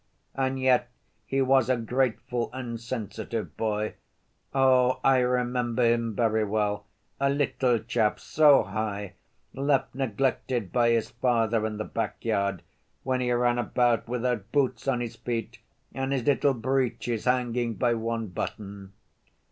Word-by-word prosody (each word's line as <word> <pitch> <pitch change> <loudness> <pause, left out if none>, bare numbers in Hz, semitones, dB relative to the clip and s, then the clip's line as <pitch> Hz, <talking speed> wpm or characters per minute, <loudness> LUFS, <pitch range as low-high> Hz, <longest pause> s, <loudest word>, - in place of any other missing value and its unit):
And 135 0 -1
yet 125 -2 +3 0.4
he 135 0 +1
was 130 -2 +3
a 130 - +3
grateful 120 0 -1
and 120 -3 -5
sensitive 115 -1 -5
boy. 110 -1 -1 0.6
Oh, 130 -2 +3
I 135 -1 +5
remember 125 -1 0
him 115 -2 +1
very 110 -1 +2
well, 105 -1 -1 0.3
a 140 0 +2
little 135 -3 +1
chap 110 -1 0
so 150 -2 +5
high, 100 0 -4 0.4
left 140 0 0
neglected 125 -3 -1
by 120 -1 +3
his 115 -1 +1
father 115 -2 +1
in 105 -1 -5
the 110 - -2
back - - -4
yard, 100 -4 0 0.4
when 130 -1 0
he 125 -1 0
ran 120 0 +2
about 120 -1 +1
without 120 -3 -2
boots 130 -4 0
on 125 -3 +1
his 120 -2 -5
feet, 115 -3 -4 0.3
and 135 0 -2
his 135 -3 0
little 140 +1 +2
breeches 120 -2 -1
hanging 120 -2 0
by 120 +5 +2
one 115 0 -2
button." 100 +1 -6
120 Hz, 140 wpm, -27 LUFS, 110-130 Hz, 0.6 s, I